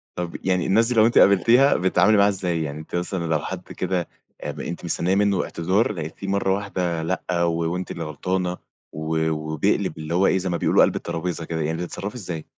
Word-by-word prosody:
طَب 90 -1 -4
يعني 90 -2 +1
الناس 115 +4 +3
دي 125 - -1
لو 110 0 +6
أنتِ 120 - +2
قابلتيها 115 +8 +5
بتتعاملي 100 +4 +3
معاها 100 +1 +5
إزاي؟ 90 -4 -1
يعني 75 0 -5
أنتِ 80 - -8
مثلًا 90 0 -2
لو 80 -2 +1
حد - - -5
كده 90 -2 -2 0.3
آب - - -5
أنتِ - - -5
مستنية 90 +3 0
منه 100 -2 +2
اعتذار 95 +7 0
لقيتيه 85 +2 -6
مرة 95 -1 +1
واحدة 90 -5 -2
لأ، 90 0 -1
و 85 0 0
وأنتِ 90 +1 -4
اللي 85 - -5
غلطانة 90 +4 -2 0.3
و 80 +1 -1
وبيقلب 80 0 -1
اللي 80 +1 -5
هو 95 +2 +3
إيه؟ 95 - +3
زي 95 0 -2
ما 85 - 0
بيقولوا - - +3
قلب - - +2
الترابيزة 85 -1 -3
كده، 80 -1 -3
يعني 80 +2 -1
بتتصرّفي 100 +5 -5
إزاي؟ 85 -8 -6
90 Hz, 205 wpm, -23 LUFS, 80-95 Hz, 0.3 s, لو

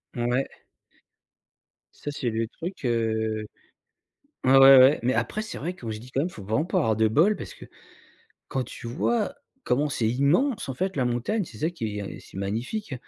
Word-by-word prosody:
Mouais. 120 +3 0 1.5
Ça, 145 - -7
c'est 125 -5 -2
le 115 0 -1
truc, 170 - -7
heu, 110 -2 0 1.0
ouais, 130 - +3
ouais, - - +8 0.2
ouais 135 +4 +6
mais 130 +2 +2
après, 215 - -1
c'est 220 - -7
vrai 175 +6 -4
quand 115 -8 -6
je 105 - -5
dis 125 +3 -12
quand 135 - 0
même, 175 - -1
faut 100 - -10
vraiment 110 - 0
pas - - 0
avoir 110 -1 +2
de 110 0 +3
bol 170 - +3
parce - - -8
que, - - -12 0.8
quand 130 -1 -2
tu 115 - -9
vois 205 - 0 0.3
comment 145 +4 +1
c'est 115 -6 0
immense, 140 - +1
en - - -4
fait, 190 +4 -2
la 130 - +1
montagne, 125 - -1
c'est 110 -8 -13
ça 160 - 0
qui 110 -11 -4
est 100 - -6
c'est - - -11
magnifique. 125 - -3
130 Hz, 195 wpm, -26 LUFS, 110-165 Hz, 1.5 s, ouais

